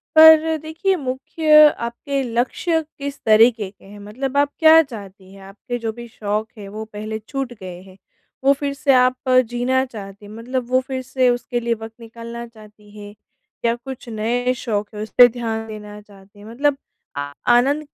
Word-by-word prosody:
पर 320 Hz, 0 st, +7 dB
देखिए 325 Hz, +5 st, -1 dB
मुख्य 305 Hz, +4 st, +4 dB, 0.2 s
आपके 275 Hz, +4 st, -3 dB
लक्ष्य 255 Hz, +8 st, -1 dB, 0.2 s
किस 280 Hz, 0 st, -6 dB
तरीके 220 Hz, -1 st, +4 dB
के 200 Hz, -, -23 dB
हैं? 205 Hz, +1 st, -13 dB
मतलब 255 Hz, +7 st, -5 dB
आप 285 Hz, 0 st, +2 dB
क्या 320 Hz, 0 st, +8 dB
चाहती 200 Hz, -8 st, -11 dB
हैं? 195 Hz, -, -14 dB
आपके 210 Hz, +6 st, -7 dB
जो 225 Hz, -, 0 dB
भी 235 Hz, -, -8 dB
शौक 215 Hz, -1 st, -3 dB
हैं 205 Hz, -2 st, -9 dB
वो 220 Hz, -, -5 dB
पहले 215 Hz, +1 st, -5 dB
छूट 265 Hz, +3 st, -5 dB
गए 180 Hz, -1 st, -9 dB
हैं, 190 Hz, 0 st, -17 dB, 0.5 s
वो 275 Hz, +1 st, +5 dB
फिर 280 Hz, -1 st, -2 dB
से 280 Hz, -1 st, +2 dB
आप 255 Hz, +1 st, +2 dB, 0.2 s
जीना 255 Hz, +2 st, +1 dB
चाहती 200 Hz, 0 st, -9 dB
हैं 205 Hz, -, -12 dB
मतलब 245 Hz, +2 st, -4 dB
वो 255 Hz, 0 st, +3 dB
फिर 260 Hz, -1 st, -3 dB
से 260 Hz, -1 st, +2 dB
उसके 245 Hz, 0 st, -1 dB
लिए 235 Hz, 0 st, -1 dB
वक़्त 225 Hz, 0 st, -8 dB
निकालना 235 Hz, +1 st, -9 dB
चाहती 215 Hz, -2 st, -18 dB
हैं 205 Hz, 0 st, -10 dB, 0.5 s
या 230 Hz, 0 st, +2 dB
कुछ 250 Hz, 0 st, -10 dB
नए 235 Hz, +3 st, -1 dB
शौक 210 Hz, -5 st, -3 dB
है, 210 Hz, -, -5 dB
उस 215 Hz, -, -8 dB
पे 245 Hz, -1 st, +10 dB
ध्यान 225 Hz, -2 st, -4 dB
देना 210 Hz, -1 st, -9 dB
चाहती 200 Hz, 0 st, -19 dB
हैं? 205 Hz, -, -13 dB
मतलब 275 Hz, +6 st, 0 dB, 0.4 s
आ 145 Hz, 0 st, -4 dB, 0.3 s
आनंद 280 Hz, +5 st, +1 dB
235 Hz, 185 wpm, -20 LUFS, 210-265 Hz, 0.5 s, पे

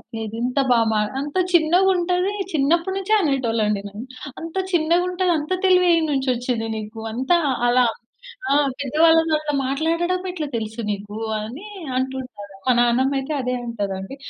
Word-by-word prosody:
నేను 220 Hz, -1 st, -5 dB
ఇంత 250 Hz, +3 st, 0 dB
బాగా 225 Hz, -2 st, +3 dB, 0.2 s
"అంత 285 Hz, +1 st, -5 dB, 0.2 s
చిన్నగా 350 Hz, +3 st, +4 dB
ఉంటది." 360 Hz, +2 st, 0 dB, 0.2 s
చిన్నప్పటి 335 Hz, +6 st, +1 dB
నుంచే 390 Hz, +2 st, -1 dB
అనేటోళ్ళు 260 Hz, -, 0 dB
అండి 205 Hz, -1 st, 0 dB
నన్ను. 210 Hz, +5 st, -8 dB, 0.3 s
"అంత 330 Hz, +1 st, -8 dB, 0.2 s
చిన్నగా 340 Hz, +1 st, +3 dB
ఉంటది 360 Hz, 0 st, 0 dB
అంత 300 Hz, +4 st, -7 dB
తెలివి 365 Hz, -1 st, +5 dB
ఏడ్నుంచి 295 Hz, -5 st, +1 dB
వచ్చిందే 240 Hz, -2 st, -2 dB
నీకు? 215 Hz, +1 st, -7 dB
అంతా 260 Hz, +9 st, +2 dB, 0.3 s
అలా 245 Hz, +1 st, +4 dB, 0.7 s
ఆ! -, -, +5 dB, 0.3 s
పెద్దవాళ్ళతో 325 Hz, +4 st, +3 dB
అట్లా 305 Hz, -1 st, -3 dB
మాట్లాడడం 335 Hz, +6 st, 0 dB
ఎట్లా 315 Hz, -4 st, -3 dB
తెలుసు 220 Hz, +1 st, -5 dB
నీకు?" 205 Hz, +1 st, -7 dB, 0.2 s
అని 255 Hz, -, -8 dB, 0.3 s
అంటుంటారు. 260 Hz, -5 st, -4 dB, 0.2 s
మా -, -, +6 dB
నాన్నమ్మ 245 Hz, +3 st, +3 dB
అయితే 270 Hz, +3 st, -4 dB
అదే 250 Hz, 0 st, -2 dB
అంటదండి. 200 Hz, -1 st, -4 dB
275 Hz, 145 wpm, -22 LUFS, 235-335 Hz, 0.7 s, మా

